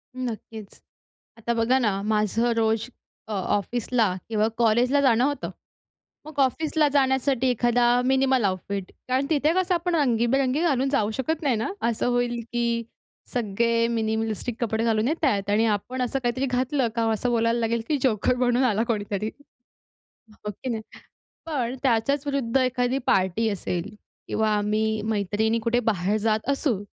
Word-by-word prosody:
नक्कीच. 225 -4 -7 0.6
आता 235 +1 -2
बघा 235 +3 +2
ना, 205 -5 0
माझं 215 +2 +1
रोज 225 +1 +1 0.4
अ, - - -8
ऑफिसला 205 +2 0
किंवा 215 -1 +2
कॉलेजला 240 +4 +3
जाणं 245 -3 +4
होतं, 285 +1 -1 0.8
मग 310 -2 -8
ऑफिसला 300 +3 +2
जाण्यासाठी 265 -1 +2
एखादा 240 0 +2 0.2
मिनिमल 265 -1 +3
आउटफिट 195 0 -3 0.2
कारण 260 +2 +1
तिथे 305 -1 +2
कसं 370 0 +1
आपण 350 0 0
रंगीबेरंगी 260 0 +2
घालून 275 -6 +1
जाऊ 220 -7 +1
शकत 280 +6 -2
नाही 270 -5 +2
ना? 220 - -1 0.2
असं 235 0 0
होईल 245 -1 0
की 240 0 0 0.7
सगळे 230 +1 +1
मिनीमलिस्टिक 220 0 -2
कपडे 225 0 -1
घालून 225 0 +1
येत 315 +2 0
आहेत 200 -6 +1
आणि 215 +2 +3
आपण 255 +5 -5
असं 250 +2 -1
काहीतरी 245 +3 0
घातलं 255 +1 0
का, 230 - +1
असं 220 +3 -1
बोलायला 230 0 +1
लागेल 230 0 0
की 300 - +2
जोकर 250 -1 +2
म्हणून 245 0 +2
आला 225 -3 +2
कोणीतरी, 210 -2 -2 1.0
हो 210 0 -7
की 210 +6 -7
नाही? 225 -2 -3 0.6
पण 260 -6 -2
त्याच्याच 270 +3 +1
विरुद्ध 275 -4 -1
एखादी 255 0 +1
पार्टी 190 +4 +2
असेल 180 -4 -3 0.4
किंवा 220 0 +1
आम्ही 215 +1 0
मैत्रिणी 215 +1 0
कुठे 230 +2 +1
बाहेर 205 -3 0
जात 215 +2 0
असू, 270 - 0
235 Hz, 150 wpm, -25 LUFS, 220-260 Hz, 1.0 s, जाणं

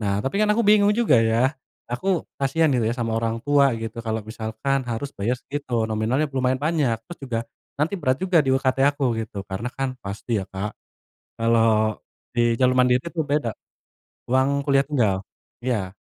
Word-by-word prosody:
Nah, 100 -1 -1
tapi 200 +10 0
kan 210 - +3
aku 220 +2 +2
bingung 205 0 +5
juga 150 - +4
ya, 115 +4 +2 0.4
aku 185 +6 0 0.2
kasihan 145 +3 +2
gitu 120 -4 +1
ya 115 - -1
sama 115 -2 -2
orang 115 0 -1
tua 145 -1 +5
gitu 115 +1 -5
kalau 110 -2 -3
misalkan 110 +5 -2
harus 130 +5 -3
bayar 115 +6 -1
segitu 125 -4 -3
nominalnya 110 +6 0
lumayan 130 -1 +1
banyak. 145 -6 +1
Terus 175 - -10
juga 115 - -1 0.4
nanti 150 +7 0
berat 130 -3 +2
juga 185 -2 +3
di 135 - -1
UKT 135 0 +1
aku 140 -1 -3 0.2
gitu, 110 -2 -7
karena 100 +5 -4
kan 135 0 -1
pasti 105 +2 -3
ya, - - -5
Kak. 95 +2 -4 0.7
Kalau 115 -2 +2 0.3
di 120 - +2 0.2
jalur 130 0 +3
mandiri 125 0 +4
itu 170 -1 -2
beda. 145 -5 0 0.8
Uang 130 +2 +3 0.2
kuliah 140 -1 +4
tunggal 110 -10 +1 0.4
iya. 110 -7 -1
125 Hz, 175 wpm, -23 LUFS, 110-145 Hz, 0.8 s, bingung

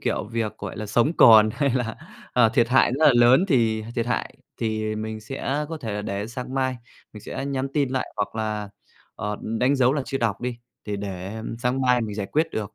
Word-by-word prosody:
kiểu, - - -1
việc, 115 0 -3
gọi - - -6
là, 110 - -5
sống 120 +8 +2
còn 110 -3 +8
hay 140 +1 +1
là, 120 -3 -2 0.4
à, 120 -2 +5
thiệt 115 0 +2
hại 130 -1 +4
rất 155 - +5
là 145 - +7
lớn, 120 +8 +6
thì 115 - +2
thiệt 115 -1 0
hại 120 - -2 0.2
thì 110 -1 -2
mình 110 0 -5
sẽ 135 +5 -3
có 165 - -3
thể 115 -8 -5
là 105 - -3
để 100 0 -3
sang 125 +2 -6
mai 130 -1 0 0.4
mình 105 - -10
sẽ 135 - -5
nhắn 135 -1 -2
tin 145 -3 +2
lại 130 0 -2
hoặc 105 - -2
là, 105 -2 -3 0.4
ờ, 105 0 -4
đánh 125 +5 +1
dấu 130 -1 +4
là 145 -1 -1
chưa 135 - -2
đọc 110 -5 -1
đi, 125 -1 -4 0.3
thì 105 -1 -3
để 100 +1 -6 0.2
sáng 125 +2 0
mai 125 -1 +3
mình 110 -3 -4
giải 100 -2 -3
quyết 155 +8 +1
được. 105 -2 -4
115 Hz, 225 wpm, -24 LUFS, 110-130 Hz, 0.4 s, còn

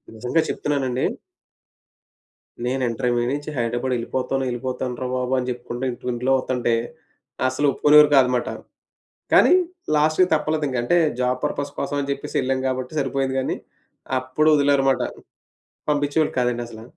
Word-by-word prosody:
నిజంగా 125 +8 +1
చెప్తున్నానండి 135 -3 -1 1.6
నేను 130 +1 -1
ఇంటర్మీడియట్ 120 +1 0
నుంచి 145 +1 -6
హైదరాబాద్ 120 +2 -1
యెళ్ళిపోతాను 130 +3 -2
యెళ్ళిపోతాను 125 0 -3
రా 130 - -1
బాబు 125 0 -1
అని 125 0 -2
చెప్పుకుంటూ 120 0 -5 0.3
ఇంట్లో 125 +3 -1
వతంటే. 125 -2 -1 0.7
అసలు 130 +3 0
ఒప్పుకునేవారు 150 +2 +6
కాదనమాట. 125 -2 +3 0.8
కానీ - - +6 0.4
లాస్ట్‌కి 155 +5 +3
తప్పలేదు. 155 0 0
ఇంకంటే, 125 +6 +1 0.2
జాబ్ 125 0 +1
పర్పస్ 145 0 -2
కోసం 145 - -2
అని 140 - -4
జెప్పేసి 140 0 -4
ఎళ్ళాం 130 0 0
గాబట్టి 130 +2 -3
సరిపోయింది 135 0 -1
గానీ. - - -2 0.6
అప్పుడు 130 +5 +1
వదిలారుమాట. 140 -2 +3 0.9
పంపించేవాళ్ళు 145 +1 +1
కాదండి 120 -1 0
అసల. 110 -1 -11
130 Hz, 125 wpm, -22 LUFS, 125-145 Hz, 1.6 s, ఒప్పుకునేవారు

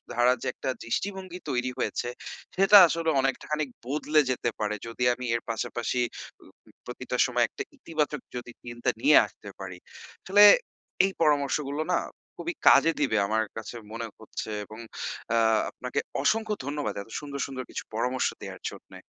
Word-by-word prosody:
ধারা 120 +1 +5
যে - - -2
একটা - - -4
দৃষ্টিভঙ্গি 185 +7 -3
তৈরি 125 -1 0
হয়েছে 120 - -1 0.5
সেটা 195 +2 +8
আসলে 165 0 -1
অনেকটা 135 -1 -1
খানিক 150 -2 0 0.2
বদলে 150 +3 +1
যেতে 120 -1 0
পারে 105 0 -1
যদি 115 +2 -4
আমি 125 +1 -6
এর 115 - -1
পাশাপাশি 120 +2 -1 0.4
ও - - -17 0.3
উ - - -18
প্রতিটা - - -4
সময় - - +2
একটা - - -5
ইতিবাচক 150 -4 -2
যদি 120 0 -6
চিন্তা 120 -1 -2
নিয়ে 150 +3 +7
আসতে 100 +1 -13
পারি। 90 -2 -7 0.5
আসলে 205 +2 +6 0.6
এই 195 - 0
পরামর্শগুলো 145 -1 +1
না - - +3 0.4
খুবই 345 - -3
কাজে 150 +4 +7
দিবে 135 -7 +2
আমার 110 +1 +1
কাছে 110 +2 -6 0.2
মনে 115 0 -4
হচ্ছে 110 0 -6 0.2
এবং 110 +2 -11 0.6
আ - - +4 0.3
আপনাকে 125 +3 -4 0.2
অসংখ্য 220 +5 +1
ধন্যবাদ 145 -6 -2
এত 105 - -12
সুন্দর, 140 -1 -7
সুন্দর 130 -1 -5
কিছু - - -5
পরামর্শ 125 +3 +1
দেয়ার - - -8
জন্যে। - - -13
135 Hz, 160 wpm, -27 LUFS, 120-155 Hz, 0.6 s, সেটা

